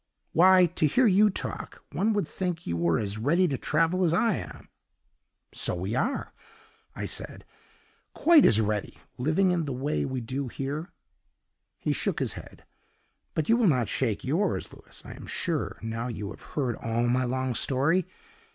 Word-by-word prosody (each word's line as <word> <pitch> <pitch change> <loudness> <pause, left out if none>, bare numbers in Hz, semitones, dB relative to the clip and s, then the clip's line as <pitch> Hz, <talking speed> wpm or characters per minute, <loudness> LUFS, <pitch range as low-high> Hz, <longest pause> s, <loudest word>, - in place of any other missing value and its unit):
'Why, 185 +2 +6
to 165 -2 +1
hear 250 - +3
you 210 0 +5
talk, 195 - -6
one 215 +3 +1
would 205 -6 0
think 180 -2 -3
you 85 - -2
were 85 -1 +2
as 105 0 -3
ready 170 +10 +3
to 140 - -1
travel 165 +7 +1
as 170 -1 +3
I 225 +3 +3
am!' - - -9 0.9
'So - - -1
we 95 +5 -3
are,' 195 - -1 0.6
I - - -4
said, - - -6 0.7
'quite 325 -4 +6
as 110 - +4
ready, 105 -1 -1 0.2
living 160 +8 +2
in 170 -3 0
the 140 - -3
way 140 +4 -1
we 130 -1 -3
do 130 +3 -4
here.' 140 +6 -5 0.9
He - - -1
shook - - -1
his - - -1
head; - - -12 0.7
but 160 -1 0
you 230 - +5
will 235 -3 +3
not 125 - +2
shake 115 -6 -1
yours, 165 +9 -1
Louis, - - -13
I - - -8
am - - -10
sure, - - -2
now 115 +1 -3
you 105 -4 -5
have - - -11 0.2
heard 130 -5 0
all 115 +1 -1
my 125 +2 +2
long 130 0 -1
story? 145 +10 +1
145 Hz, 175 wpm, -27 LUFS, 120-180 Hz, 0.9 s, Why